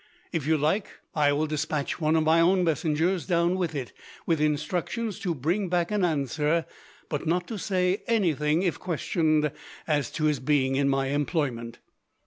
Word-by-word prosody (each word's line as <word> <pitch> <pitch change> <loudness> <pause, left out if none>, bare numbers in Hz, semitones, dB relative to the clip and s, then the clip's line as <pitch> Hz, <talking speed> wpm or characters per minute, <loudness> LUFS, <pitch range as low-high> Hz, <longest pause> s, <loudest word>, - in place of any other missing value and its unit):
If 160 -5 -2
you 160 0 +3
like, 155 +8 +1 0.3
I 145 -2 +3
will 145 +2 +1
despatch 155 +1 -2
one 155 +1 +2
of 160 - +3
my 160 +1 +4
own 180 +2 +4
messengers 165 +1 0
down 170 +1 +2
with 175 -4 -2
it, 130 -4 -4 0.3
with 165 -3 +1
instructions 170 +8 -1
to 175 -3 -2
bring 175 +8 -1
back 175 0 0
an 210 -2 +1
answer, 155 +1 +1 0.4
but 150 +1 -3
not 175 +2 +1
to 220 -3 -4
say 185 +1 0
anything, 165 - +2
if 170 -5 -1
questioned, 155 -2 +1 0.3
as 145 -3 0
to 155 - -3
his 150 -3 +2
being 135 0 +1
in 140 0 +2
my 135 0 +1
employment." 135 -5 -1
160 Hz, 170 wpm, -27 LUFS, 145-175 Hz, 0.4 s, my